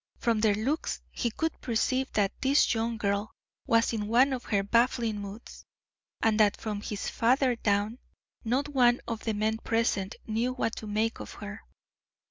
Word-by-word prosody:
From 230 -3 +1
their 215 -2 +3
looks 265 +10 -1
he 240 - -1
could 320 +8 -3
perceive 255 +3 0
that 200 -2 +2
this 275 0 +4
young 230 0 -1
girl 200 0 -1 0.4
was 230 0 +3
in 210 -2 -2
one 255 +5 +4
of 250 - -4
her 200 -2 +1
baffling 230 0 +1
moods, 200 +3 -9 0.6
and 225 -1 +3
that 210 -1 +4
from 210 -2 -4
his 210 -1 -4
father 255 +2 +2
down, 210 +2 0 0.4
not 255 +5 0
one 250 -4 +3
of 230 -2 -4
the 220 - 0
men 220 +1 0
present 225 -4 0
knew 230 +3 -1
what 240 -3 -1
to 215 - -6
make 215 +2 -1
of - - -8
her. 205 +2 -8
225 Hz, 170 wpm, -29 LUFS, 210-245 Hz, 0.6 s, this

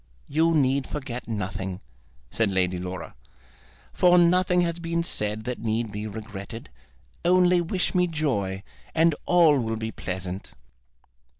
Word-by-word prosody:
You 165 +3 +2
need 135 -2 +2
forget 130 -4 -5
nothing," 95 -3 -4 0.5
said 115 -2 +1
Lady 90 -2 0
Laura, 90 +1 -6 0.8
"for 180 0 +5
nothing 180 +1 +4
has 170 -1 -1
been 170 0 -1
said 105 -8 -2
that 125 +1 -4
need 110 0 -1
be 105 +1 -4
regretted. 110 - -8 0.5
Only 180 0 +4
wish 175 +2 -1
me 180 -1 +3
joy, 105 - -1 0.3
and 165 0 +4
all 165 -5 +5
will 115 -2 -1
be 110 0 -4
pleasant." 95 -1 -5
120 Hz, 130 wpm, -26 LUFS, 100-170 Hz, 0.8 s, for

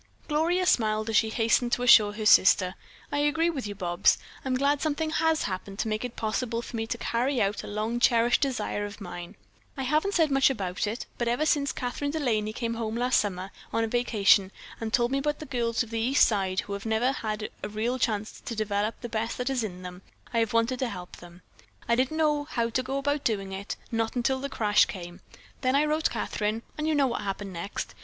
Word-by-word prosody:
Gloria 335 +4 +1
smiled 215 -5 +2
as - - -1
she 220 +1 +4
hastened 230 +2 +2
to 245 - +1
assure 215 -4 +7
her 215 +1 -5
sister: 185 -3 +6 0.4
"I 285 - 0
agree 325 +3 +2
with 270 -9 -4
you, 205 - -6
Bobs. 175 -3 +2 0.3
I'm 260 -1 0
glad 280 +2 +2
something 310 0 -1
has 320 0 +2
happened 195 +1 -5
to 220 - -1
make 215 +1 -2
it 245 -1 -5
possible 230 +1 -2
for - - -8
me 225 0 -2
to 230 +1 -3
carry 245 +3 0
out 200 0 0
a - - -8
long 215 +3 -2
cherished 240 -1 +4
desire 245 -7 -1
of 205 0 -7
mine. 175 -1 -8 0.4
I 265 - -2
haven't 305 +9 +1
said 320 -4 +3
much 270 0 +5
about 195 -6 -2
it, 225 +4 -4
but 240 - 0
ever 245 +6 +1
since 285 -3 +2
Kathryn 250 +3 -3
De 315 +2 -2
Laney 215 -6 0
came 230 +1 -3
home 225 -1 -3
last 250 +1 +3
summer 190 -2 -3 0.2
on 225 - +1
a - - 0
vacation 210 -5 +3 0.3
and 225 -1 -4
told 240 +1 +2
me 275 - +1
about 295 +1 -1
the 310 - -8
girls 235 -4 0
of 230 - -12
the 230 - -1
East 255 +5 +4
Side 190 -3 0
who 200 - -7
have 200 +2 -5
never 220 +4 +2
had 215 -4 -4
a 205 - -4
real 230 +5 -2
chance 215 -2 -2
to 230 - -5
develop 210 0 -1
the 240 - -4
best 225 0 -3
that 250 +2 -1
is 255 -3 0
in 185 -4 -6
them, 180 0 -8 0.3
I 230 - +2
have 225 -1 +1
wanted 230 +2 +1
to 255 - 0
help 180 -4 -8
them. 175 +1 -14 0.4
I 235 - +2
didn't 260 +5 0
know 300 -2 +2
how 235 -5 -1
to 255 - +1
go 265 +2 -3
about 285 +1 -1
doing 195 -4 -1
it, 195 +1 -5 0.2
not 225 0 -1
until 255 +2 +1
the 280 +1 -4
crash 210 -5 +3
came. 175 -2 -8 0.4
Then 255 0 +2
I 290 +2 +4
wrote 310 +1 +1
Kathryn, 215 +2 -2
and 305 0 -2
you 315 - +2
know 285 -1 +4
what 245 - -2
happened 195 -1 -4
next. 170 +4 -5
230 Hz, 230 wpm, -27 LUFS, 210-270 Hz, 0.4 s, assure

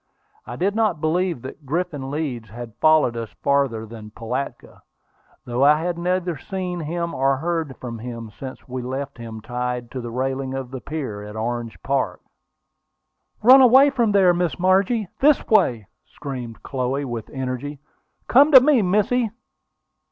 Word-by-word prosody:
I - - -6
did 195 +3 0
not 215 -7 +1
believe 165 -2 0
that 135 +3 -9
Griffin 145 -2 -3
Leeds 135 -7 -4
had 115 +1 -9
followed 155 -6 +4
us 115 -2 -4
farther 135 -6 +1
than 110 -1 -10
Pilatka, 125 +5 -6 0.6
though 120 +2 0
I 150 +2 +6
had 175 -1 -2
neither 175 -3 -1
seen 180 +1 -4
nor 160 -4 -1
heard 160 -2 -2
from 115 -2 -7
him 115 -1 -7
since 130 -1 -8
we 130 0 -4
left 130 +1 -5
him 110 -2 -8
tied 125 0 -4
to 130 - -5
the 120 - -6
railing 130 +2 -2
of 130 -2 -5
the 130 -2 -6
pier 135 -10 -5
at 105 +1 -9
Orange 115 +1 -4
Park. 140 0 -1 1.2
"Run 260 +4 +9
away 265 +3 +7
from 235 -6 +1
there, 190 -3 +5
Miss 175 -2 -1
Margie! 190 +4 +2
This 290 +1 +4
way!" 120 - +3 0.2
screamed 125 -5 -7
Chloe, 135 +1 -2
with 120 -4 -5
energy. 130 +2 -4 0.5
"Come 285 +5 +6
to 260 - +12
me, 265 -2 +4
missy!" 210 +5 +1
140 Hz, 155 wpm, -22 LUFS, 120-180 Hz, 1.2 s, to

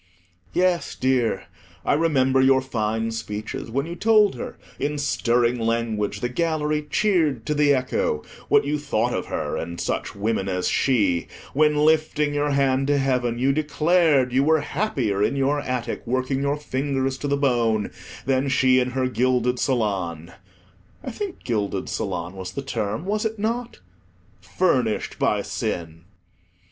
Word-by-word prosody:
Yes, 180 -1 +1
dear, 125 -6 +1 0.4
I - - +3
remember 135 -4 +3
your 130 0 +5
fine 115 -3 -2
speeches, 110 -1 -5
when 135 +5 -1
you 170 +1 -6
told 215 +2 +4
her, 125 - -7 0.2
in 150 +1 -1
stirring 120 -4 +1
language 110 -3 -1
the 120 - 0
gallery 150 +1 -1
cheered 160 - +1
to 150 - 0
the 145 -1 +3
echo, 125 - -1 0.2
what - - +4
you 150 +1 -1
thought 120 -4 0
of - - -3
her - - -3
and 85 - -4
of 85 - -8
such - - -3
women 100 -1 -1
as 90 -1 -1
she; 100 -10 +2 0.3
when, 150 +1 +3
lifting 150 -1 +2
your 145 0 0
hand 135 -1 +2
to 145 0 +3
heaven, 125 -3 0
you 135 +3 +2
declared 155 -3 +2
you 135 +2 +4
were 160 +1 +3
happier 145 - -1
in 120 - +2
your 140 +2 +1
attic, 125 -4 -3
working 130 +2 0
your 140 +1 0
fingers 135 -2 -1
to 145 - -3
the 140 0 +1
bone, 120 -6 +1 0.3
than 135 +1 +1
she 130 -1 +4
in 125 0 0
her 130 0 -1
gilded 125 0 +1
salon—I 95 - -4
think 405 -4 -6
"gilded 105 -4 -2
salon" 85 +2 -3
was 95 -1 -7
the 140 - -4
term, 110 - -3
was 210 +2 -1
it 220 0 -2
not?—furnished 200 - -3
by - - +1
sin. 80 -1 -4
130 Hz, 155 wpm, -23 LUFS, 115-150 Hz, 0.4 s, your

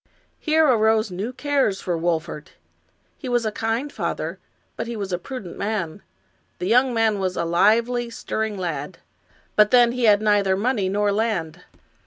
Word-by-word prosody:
Here 315 0 +3
arose 220 -5 +3
new 195 +7 -4
cares 270 -7 0
for 175 - -2
Wolfert. 165 -1 -3 0.7
He 260 - -6
was 240 -2 +1
a 215 - 0
kind 225 +7 -2
father, - - -3 0.4
but - - -4
he 235 - -4
was 200 -3 -4
a 175 - -1
prudent 250 -6 -8
man. 200 -4 -3 0.6
The - - -4
young 250 +6 +4
man 225 -3 +1
was 185 -1 -2
a 170 - 0
lively, 230 +8 +2
stirring 220 -2 -3
lad, 165 -3 -4 0.6
but 210 0 +5
then 240 -1 +5
he 245 -1 -1
had 205 -2 +6
neither 205 -3 +2
money 210 -3 0
nor 205 +1 +1
land. 195 -6 -2
215 Hz, 165 wpm, -23 LUFS, 185-235 Hz, 0.7 s, had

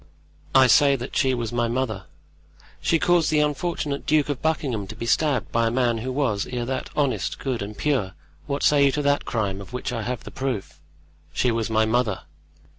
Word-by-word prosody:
"I 135 -1 +8
say 140 +2 +5
that 125 0 -6
she 130 -1 +2
was 120 -2 -4
my 120 -1 +1
mother." 115 -5 -2 0.8
"She 165 - +2
caused 175 0 +3
the 155 - +3
unfortunate 150 -1 -2
Duke 150 -2 +3
of 140 -3 -2
Buckingham 135 -10 -1
to 110 - -8
be 115 - -5
stabbed 140 0 +1
by 115 0 +2
a - - +2
man 120 -1 +1
who 130 +4 -4
was, 125 -7 0
ere 120 -1 -3
that, 130 +2 -3
honest, 140 -3 0
good 130 -5 -3
and 105 +1 -6
pure. 130 - 0 0.3
What 140 0 -2
say 145 -1 +5
you 140 - +4
to 150 - -1
that 145 0 +1
crime, 100 -4 -2
of 100 - -11
which 125 0 -3
I 115 - -2
have 120 +1 -4
the - - -9
proof?" 125 - -4 0.5
"She 125 - +1
was 115 -1 -1
my 110 0 +3
mother." 110 -3 0
125 Hz, 205 wpm, -24 LUFS, 115-140 Hz, 0.8 s, I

